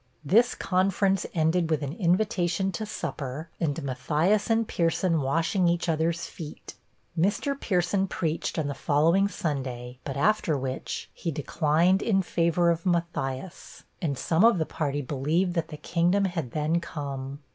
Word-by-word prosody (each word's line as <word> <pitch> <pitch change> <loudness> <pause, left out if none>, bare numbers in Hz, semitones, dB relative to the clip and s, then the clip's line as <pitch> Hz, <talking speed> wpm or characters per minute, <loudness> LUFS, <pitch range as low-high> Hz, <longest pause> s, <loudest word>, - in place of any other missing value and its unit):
This 230 - +4
conference 190 +1 +1
ended 165 +1 +2
with 155 -2 0
an 140 +1 -3
invitation 180 0 +1
to 215 +4 -4
supper, 155 -4 -5
and 145 -5 -1
Matthias 150 - +1
and 225 -1 +2
Pierson 165 -1 +1
washing 165 +7 +1
each 170 +1 +1
other's 165 +1 0
feet. 155 -3 -9 0.4
Mr. 200 - +1
Pierson 195 -6 0
preached 165 -2 -2
on 160 - 0
the 140 - -2
following 165 +8 +3
Sunday, 130 -8 -4
but 135 -1 -4
after 170 -2 +2
which, 130 0 -4
he 170 - -4
declined 160 +5 +2
in 195 -4 +2
favor 170 0 +2
of 165 0 -2
Matthias, 170 -2 -3 0.2
and 145 -6 -1
some 165 +7 +2
of 230 -3 +6
the 160 - 0
party 145 -2 -2
believed 155 +7 0
that 165 -2 -1
the 150 - -8
'kingdom 175 +6 +1
had 170 -8 -2
then 155 +6 0
come.' 140 -4 -5
165 Hz, 150 wpm, -27 LUFS, 145-185 Hz, 0.4 s, of